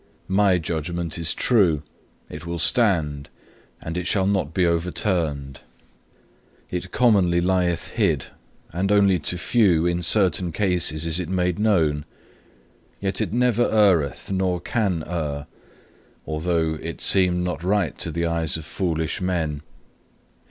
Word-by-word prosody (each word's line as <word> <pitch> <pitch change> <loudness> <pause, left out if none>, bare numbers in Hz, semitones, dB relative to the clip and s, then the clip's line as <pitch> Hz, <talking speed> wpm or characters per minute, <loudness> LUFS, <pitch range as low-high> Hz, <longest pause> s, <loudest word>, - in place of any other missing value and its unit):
My 100 -2 +4
judgment 85 +1 -4
is 80 -1 +1
true; 90 - +2 0.4
it 75 +1 -9
will 85 0 -4
stand, 85 - +1 0.5
and 80 - -6
it 90 -1 -3
shall 95 -2 +1
not 95 -6 0
be 90 +2 +1
overturned. 85 -5 -1 1.1
It 90 +1 -4
commonly 100 -8 +3
lieth 90 -1 0
hid, - - 0 0.5
and 95 +4 -1
only 100 -3 +4
to 85 +4 0
few 90 -4 +2
in 85 0 0
certain 90 -1 +2
cases 85 -5 0
is 85 +1 +1
it 90 -2 -4
made 90 0 0
known; 80 -9 +1 0.9
yet 95 -1 -1
it - - -2
never 120 0 +2
erreth, 95 -8 +2
nor 95 -2 0
can 95 -6 -1
err, 75 -4 -4 0.8
although 80 0 -1
it 85 0 -6
seem 90 -2 +4
not 90 -2 -3
right 95 -2 0
to - - 0
the 85 +2 -2
eyes 85 -1 -1
of 80 - -9
foolish 80 -2 -2
men. 80 -5 -2
90 Hz, 135 wpm, -23 LUFS, 80-95 Hz, 1.1 s, My